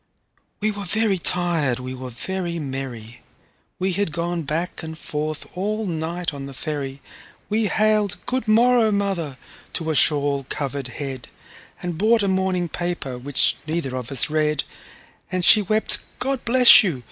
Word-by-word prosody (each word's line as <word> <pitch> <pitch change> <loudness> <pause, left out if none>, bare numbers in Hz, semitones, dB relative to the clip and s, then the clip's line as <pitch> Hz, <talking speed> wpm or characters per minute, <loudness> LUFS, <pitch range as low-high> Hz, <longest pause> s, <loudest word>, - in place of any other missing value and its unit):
We 215 +1 +1
were 205 -1 -5
very 205 +1 +1
tired, 170 -8 +1
we 130 0 -6
were 130 0 -7
very 175 +7 -4
merry, 130 -6 -6 0.6
We 190 0 -1
had 200 -3 -1
gone 170 +1 -2
back 165 +4 -3
and 160 -1 -7
forth 155 -1 -4
all 210 +4 -2
night 170 -1 -3
on 140 -1 -7
the 135 - -10
ferry, 140 -2 -4 0.5
We 215 +1 +1
hailed 215 -2 +1
"Good 255 -2 -2
morrow, 230 0 +4
mother!" 190 -9 -2 0.4
to 160 -2 -2
a - - -1
shawl 140 -2 +4
covered 140 -2 -3
head, 130 -1 -6 0.6
And 175 -2 -4
bought 220 +1 +3
a - - +1
morning 190 -2 0
paper, 170 -8 -4
which 140 +2 +1
neither 155 -5 -2
of 125 -1 -5
us 135 - +3
read; 150 -1 0 0.7
And 185 -1 0
she 215 - +8
wept, 215 +2 +2 0.2
"God 270 -1 -2
bless 250 +1 +8
you!" 170 -11 -1
170 Hz, 160 wpm, -22 LUFS, 140-200 Hz, 0.7 s, she